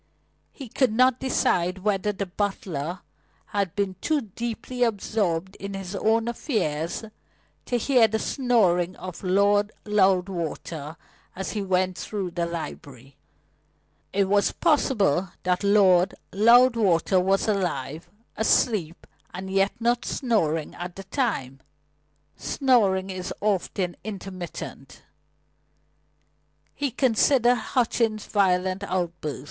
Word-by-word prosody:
He 270 - -9
could 250 +1 +1
not 255 +2 +3
decide 185 -8 0
whether 210 0 +1
the 200 0 -4
butler 180 -4 -3 0.4
had 200 -3 -2
been 200 -3 -1
too 310 -2 +1
deeply 235 +3 -6
absorbed 200 -5 0
in 200 0 -6
his 195 0 -6
own 225 +3 +1
affairs 170 - -2 0.6
to 245 - +1
hear 240 -1 +4
the 220 0 -1
snoring 195 -9 +1
of 185 0 -9
Lord 200 +2 +3
Loudwater 180 -6 0 0.4
as 190 +1 -4
he 210 - -3
went 185 -1 0
through 195 -4 -4
the 170 0 -2
library. 140 -6 -8 1.0
It 195 -1 +1
was 200 +1 +3
possible 210 - +2
that 180 +1 0
Lord 195 -3 +4 0.2
Loudwater 215 -5 +4
was 195 +3 +1
alive, 175 -6 -2 0.3
asleep, 210 -6 +1 0.3
and 190 +1 -6
yet 195 +1 +2
not 240 +1 +1
snoring 165 - 0
at 175 0 -7
the 195 - -8
time. 190 - -2 0.8
Snoring 200 -8 +1
is 185 -1 -5
often 190 -3 -1
intermittent. 190 -4 -8 1.7
He 285 -1 -2
considered 245 0 +3
Hutchings' 230 -2 0
violent 185 -1 +1
outburst. 170 -6 -3
195 Hz, 110 wpm, -25 LUFS, 180-225 Hz, 1.7 s, hear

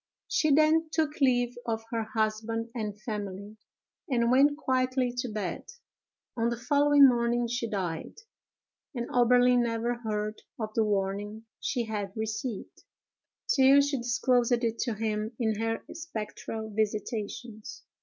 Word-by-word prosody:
She 310 - +2
then 310 +2 +4
took 310 -2 -1
leave 245 -2 +3
of 225 -1 -1
her 230 -1 0
husband 220 +1 -2
and 210 -4 -4
family, 205 -1 -6 0.5
and 235 -2 +2
went 285 +3 +5
quietly 255 -3 0
to 250 - -1
bed. 210 -5 -4 0.7
On 230 -1 +1
the 235 - -2
following 285 +3 +5
morning 240 -1 +1
she 235 0 -2
died; 180 -6 -3 0.8
and 240 -1 -3
Oberlin 245 0 +5
never 235 0 0
heard 215 -1 -3 0.2
of 215 -1 -4
the 225 - +2
warning 205 +1 -2
she 245 -3 -1
had 205 -3 -4
received, 220 0 -4 0.7
till 270 +1 +6
she 285 0 0
disclosed 245 0 +1
it 230 -1 -1
to 235 -4 -1
him 215 +1 -2
in 220 -3 0
her 225 0 -1
spectral 220 -7 -6
visitations. 215 +1 -4
230 Hz, 135 wpm, -28 LUFS, 215-250 Hz, 0.8 s, till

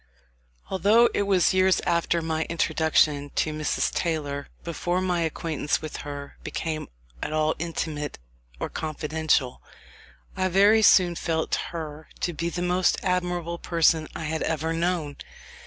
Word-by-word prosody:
Although 215 +5 +5
it 200 - 0
was 190 -3 +3
years 185 0 +4
after 170 -1 +1
my 160 0 -1
introduction 155 -3 +2
to 155 - 0
Mrs. 155 -1 -1
Taylor 145 -4 -2 0.2
before 175 +2 -1
my 180 -2 0
acquaintance 160 -2 -1
with 155 -1 -6
her 145 -1 -7
became 155 -1 -3 0.3
at - - -3
all 155 0 +2
intimate 160 -3 -3 0.4
or - - -2
confidential, 155 -3 -1 0.7
I 185 - +1
very 200 +4 +5
soon 185 -4 +6
felt 165 -1 -2 0.2
her 155 -2 -7
to 175 - -1
be 170 +2 -2
the 175 +1 -3
most 180 +1 +2
admirable 175 -2 -1
person 165 -2 +2
I - - -4
had 160 +1 -2
ever 160 0 -1
known. 165 -3 -1
165 Hz, 140 wpm, -26 LUFS, 155-180 Hz, 0.7 s, soon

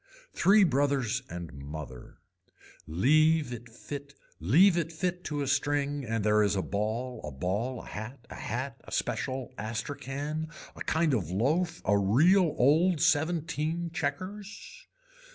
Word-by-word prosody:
Three 200 +3 +5
brothers 135 - +1
and 85 -2 -7
mother. 70 -2 -9 0.7
Leave 150 - +3
it 120 0 -9
fit 160 - 0
to 145 -1 -2
a - - -3
string 145 0 0
and 115 -2 -1
there 105 0 +4
is 100 -1 +2
a 95 - 0
ball 110 +5 -2
a 75 - -4
ball 100 - -2
a - - -12
hat, 115 +4 -8
a - - -7
hat 125 +3 -4
a - - -13
special 130 0 -2
astracan, 140 +7 -4 0.2
a - - -12
kind 160 -2 +1
of 95 -10 0
loaf, 155 - 0
a 100 - +4
real 155 - +4
old 160 +6 +4
seventeen 160 +1 0
checkers. 200 - -5
140 Hz, 130 wpm, -29 LUFS, 110-160 Hz, 0.7 s, Three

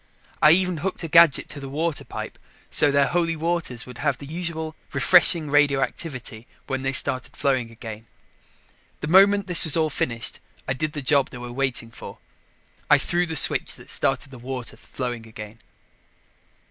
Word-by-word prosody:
I 150 - +7
even 180 -1 +1
hooked 180 +3 -3
a - - -3
gadget 165 -2 +5
to 145 - -6
the 135 -1 -8
water 155 +2 -2
pipe - - -8 0.3
so 150 - +4
their 140 0 +3
Holy 165 +1 0
Waters 160 -7 -2
would 125 -2 -12
have 140 -3 0
the 140 - -10
usual 160 0 -5 0.2
refreshing 170 -4 +4
radioactivity 135 -4 -1 0.2
when 135 -1 -3
they 135 0 -1
started 130 -1 -1
flowing 130 -5 0
again. 110 -1 -10 0.9
The 150 - -4
moment 200 +3 +5
this 180 -3 +6
was 160 -1 +5
all 155 -1 +1
finished, 115 -4 -3 0.3
I 130 - 0
did 150 +3 -3
the 145 - -6
job 140 0 +3
they - - -10
were 120 0 -8
waiting 125 -3 -1
for. - - -11 0.7
I 150 - +7
threw 175 +5 -1
the 160 - -4
switch - - +3
that - - -11
started 135 +1 -1
the 130 - -11
water 125 0 -5
flowing 120 -3 -6
again. 105 0 -11
140 Hz, 170 wpm, -23 LUFS, 125-165 Hz, 0.9 s, I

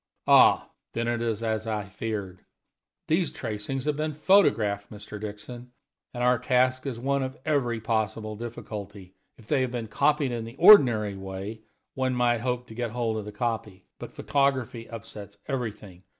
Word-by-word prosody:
"Ah! - - +5 0.2
then 115 0 -1
it 120 0 -1
is 115 -1 -2
as 110 0 -1
I 105 -2 -1
feared. 100 -2 -5 0.6
These 165 +1 +2
tracings 110 +5 -4
have 150 -1 +1
been 155 0 -2
photographed, 115 - +3
Mr. 105 0 -9
Dixon, 120 +4 -8 0.4
and 120 -1 -4
our 125 -1 +3
task 130 +1 +1
is 125 -4 -3
one 140 +3 0
of 130 0 -4
every 125 -7 +1
possible 110 -1 -2
difficulty. 105 -4 -8 0.2
If 115 - -17
they 135 +3 +1
had 130 - 0
been 120 -2 -4
copied 145 +5 +1
in 120 -1 -3
the 115 +2 -9
ordinary 125 - +7
way, 95 +3 -7 0.3
one 130 -1 -1
might 120 -2 +2
hope 125 0 -2
to - - -9
get 120 +1 -3
hold 115 -1 -1
of 105 - -5
the 105 - -7
copy. 105 -4 -3
But - - -8
photography 130 -5 -1
upsets 105 -2 -9
everything. 105 -8 -5
115 Hz, 165 wpm, -27 LUFS, 105-130 Hz, 0.6 s, ordinary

